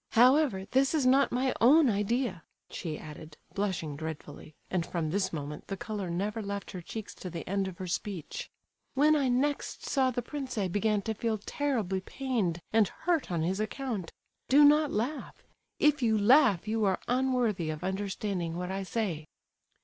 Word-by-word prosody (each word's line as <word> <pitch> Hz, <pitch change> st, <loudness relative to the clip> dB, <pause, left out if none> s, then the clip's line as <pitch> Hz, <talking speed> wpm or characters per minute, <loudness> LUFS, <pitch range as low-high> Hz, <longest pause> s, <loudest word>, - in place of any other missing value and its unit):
However, 250 Hz, -4 st, +4 dB
this 265 Hz, +8 st, +2 dB
is 290 Hz, -4 st, +2 dB
not 270 Hz, +2 st, +4 dB
my 255 Hz, +1 st, +1 dB
own 285 Hz, +6 st, +7 dB
idea," 210 Hz, -3 st, 0 dB, 0.3 s
she 155 Hz, -4 st, -4 dB
added, 155 Hz, 0 st, -10 dB, 0.2 s
blushing 185 Hz, -7 st, -2 dB
dreadfully; 155 Hz, -1 st, -7 dB
and 180 Hz, -3 st, 0 dB
from 165 Hz, -2 st, -3 dB
this 195 Hz, +1 st, 0 dB
moment 150 Hz, -1 st, -6 dB
the 195 Hz, -, -4 dB
colour 205 Hz, -3 st, -4 dB
never 205 Hz, +6 st, -2 dB
left 200 Hz, -1 st, -5 dB
her 180 Hz, -, -6 dB
cheeks 215 Hz, +5 st, -7 dB
to 185 Hz, -, -7 dB
the 170 Hz, -1 st, -7 dB
end 195 Hz, 0 st, 0 dB
of 185 Hz, -2 st, -7 dB
her 185 Hz, -, -5 dB
speech. 180 Hz, -1 st, -4 dB, 0.5 s
"When 300 Hz, +3 st, +5 dB
I 280 Hz, -3 st, +2 dB
next 275 Hz, +4 st, -1 dB
saw 265 Hz, -2 st, +2 dB
the 245 Hz, -1 st, -2 dB
prince 275 Hz, -5 st, -5 dB
I 195 Hz, -3 st, 0 dB
began 205 Hz, +2 st, +1 dB
to 220 Hz, -, -1 dB
feel 220 Hz, 0 st, -1 dB
terribly 215 Hz, -5 st, -1 dB
pained 205 Hz, -9 st, -2 dB
and 220 Hz, -2 st, +5 dB
hurt 335 Hz, -, -1 dB
on 165 Hz, -2 st, 0 dB
his 185 Hz, +4 st, -1 dB
account. 215 Hz, -4 st, -3 dB, 0.4 s
Do 290 Hz, +2 st, +7 dB
not 300 Hz, 0 st, +5 dB
laugh; 250 Hz, +8 st, -3 dB, 0.3 s
if 295 Hz, -1 st, +3 dB
you 220 Hz, -3 st, +3 dB
laugh 215 Hz, -, +5 dB
you 220 Hz, 0 st, 0 dB
are 190 Hz, -2 st, +2 dB
unworthy 245 Hz, -9 st, +1 dB
of 155 Hz, +2 st, -5 dB
understanding 190 Hz, -2 st, -2 dB
what 180 Hz, +1 st, -3 dB
I 195 Hz, +1 st, -2 dB
say." 185 Hz, -6 st, -3 dB
205 Hz, 175 wpm, -30 LUFS, 180-255 Hz, 0.5 s, own